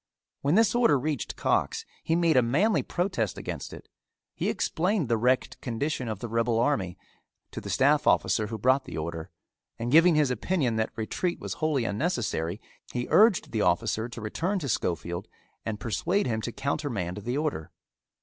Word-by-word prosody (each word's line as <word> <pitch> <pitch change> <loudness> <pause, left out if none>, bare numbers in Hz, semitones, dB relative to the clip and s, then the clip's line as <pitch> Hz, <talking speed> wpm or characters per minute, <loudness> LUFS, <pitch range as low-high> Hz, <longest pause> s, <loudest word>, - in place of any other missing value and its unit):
When 145 +4 +2
this 225 0 +4
order 235 - +4
reached 145 -1 -3
Cox - - 0 0.2
he 165 - +1
made 170 -2 +3
a 130 - +7
manly 165 - +2
protest 175 - -2
against - - -5
it. - - -11 0.5
He - - -1
explained 180 - 0
the 115 - +3
wrecked 125 +3 +1
condition 130 +2 -2
of 110 -2 -3
the 120 - -3
rebel 115 0 +1
army 115 -8 0 0.5
to - - -6
the - - -7
staff - - +3
officer, 105 - +3
who 110 +1 -5
brought 130 +5 +2
the - - -7
order, 80 +2 -4 0.5
and 120 +1 -3
giving 165 +3 +6
his 150 -4 +3
opinion 125 - 0
that 110 - 0
retreat 175 +11 -2
was - - -4
wholly 150 -6 +1
unnecessary, 105 - -1 0.3
he 120 0 -2
urged 215 -3 +5
the 110 - 0
officer 110 +5 +1
to 120 - -8
return 170 - -1
to 145 -7 -3
Schofield 85 -1 -2 0.4
and 110 -1 -3
persuade 170 - 0
him 110 -2 -1
to 120 - -4
countermand 130 - -2
the 120 +6 -3
order. 150 - -2
125 Hz, 175 wpm, -27 LUFS, 110-155 Hz, 0.5 s, a